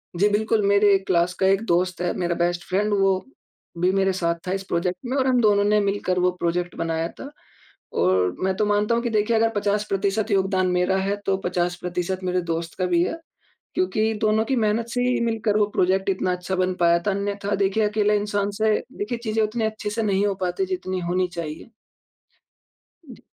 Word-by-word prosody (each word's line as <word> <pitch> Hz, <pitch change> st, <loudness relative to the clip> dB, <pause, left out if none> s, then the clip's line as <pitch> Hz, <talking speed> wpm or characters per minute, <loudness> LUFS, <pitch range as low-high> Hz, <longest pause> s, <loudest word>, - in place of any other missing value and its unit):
जी, 195 Hz, +4 st, +3 dB
बिल्कुल 215 Hz, +1 st, +1 dB
मेरे 200 Hz, 0 st, +5 dB
क्लास 175 Hz, 0 st, +2 dB
का 190 Hz, -, +2 dB
एक 195 Hz, +1 st, +3 dB
दोस्त 180 Hz, +1 st, +1 dB
है, 175 Hz, -, 0 dB
मेरा 175 Hz, -1 st, -1 dB
बेस्ट 175 Hz, +1 st, 0 dB
फ्रेंड 205 Hz, +3 st, 0 dB
वो 195 Hz, -1 st, +3 dB, 0.6 s
भी 180 Hz, +1 st, +3 dB
मेरे 195 Hz, 0 st, +2 dB
साथ 170 Hz, -2 st, 0 dB
था -, -, -1 dB
इस 195 Hz, 0 st, -3 dB
प्रोजेक्ट 180 Hz, 0 st, -1 dB
में 250 Hz, +2 st, -2 dB
और 265 Hz, -1 st, +2 dB
हम 250 Hz, -2 st, +3 dB
दोनों 205 Hz, -2 st, +4 dB
ने 210 Hz, +1 st, +3 dB
मिलकर 195 Hz, -2 st, 0 dB
वो 180 Hz, 0 st, +3 dB
प्रोजेक्ट 175 Hz, +1 st, -1 dB
बनाया 165 Hz, 0 st, -1 dB
था। 275 Hz, -, -7 dB, 0.7 s
और 90 Hz, 0 st, +2 dB
मैं 190 Hz, 0 st, +1 dB
तो 210 Hz, -, +2 dB
मानता 210 Hz, +2 st, +2 dB
हूँ 235 Hz, -, -1 dB
कि 240 Hz, -, 0 dB
देखिए 215 Hz, +1 st, +1 dB
अगर 225 Hz, 0 st, +3 dB
50% 205 Hz, +1 st, 0 dB
योगदान 190 Hz, -1 st, +2 dB
मेरा 180 Hz, +1 st, +1 dB
है, 195 Hz, +1 st, 0 dB
तो 195 Hz, -1 st, +1 dB
50% 180 Hz, +1 st, -2 dB
मेरे 180 Hz, 0 st, 0 dB
दोस्त 165 Hz, 0 st, -4 dB
का 185 Hz, -, +1 dB
भी 175 Hz, -1 st, +2 dB
है 330 Hz, -, -3 dB, 0.6 s
क्योंकि 225 Hz, -12 st, +1 dB
दोनों 215 Hz, +1 st, +2 dB
की 265 Hz, -, 0 dB
मेहनत 225 Hz, +1 st, +1 dB
से 245 Hz, +1 st, -1 dB
ही 250 Hz, -, +1 dB
मिलकर 225 Hz, -2 st, 0 dB
वो 210 Hz, -, +4 dB
प्रोजेक्ट 190 Hz, +2 st, +2 dB
इतना 185 Hz, -1 st, 0 dB
अच्छा 180 Hz, +1 st, -3 dB
बन 185 Hz, 0 st, +1 dB
पाया 170 Hz, 0 st, +4 dB
था। -, -, +3 dB
अन्यथा 200 Hz, +1 st, -2 dB
देखिए 200 Hz, +2 st, +1 dB
अकेले 210 Hz, 0 st, +2 dB
इंसान 205 Hz, 0 st, -1 dB
से 220 Hz, -1 st, +3 dB, 0.2 s
देखिए 220 Hz, +4 st, -3 dB
चीज़ें 220 Hz, -1 st, 0 dB
उतनी 220 Hz, +1 st, -1 dB
अच्छे 215 Hz, -1 st, -3 dB
से 225 Hz, +2 st, -2 dB
नहीं 200 Hz, -1 st, +1 dB
हो 200 Hz, -, 0 dB
पाती, 185 Hz, -, -2 dB
जितनी 360 Hz, -, -3 dB
होनी 180 Hz, +1 st, 0 dB
चाहिए। 170 Hz, 0 st, -7 dB, 1.4 s
जी। 250 Hz, -5 st, -13 dB
195 Hz, 200 wpm, -23 LUFS, 180-215 Hz, 1.4 s, मेरे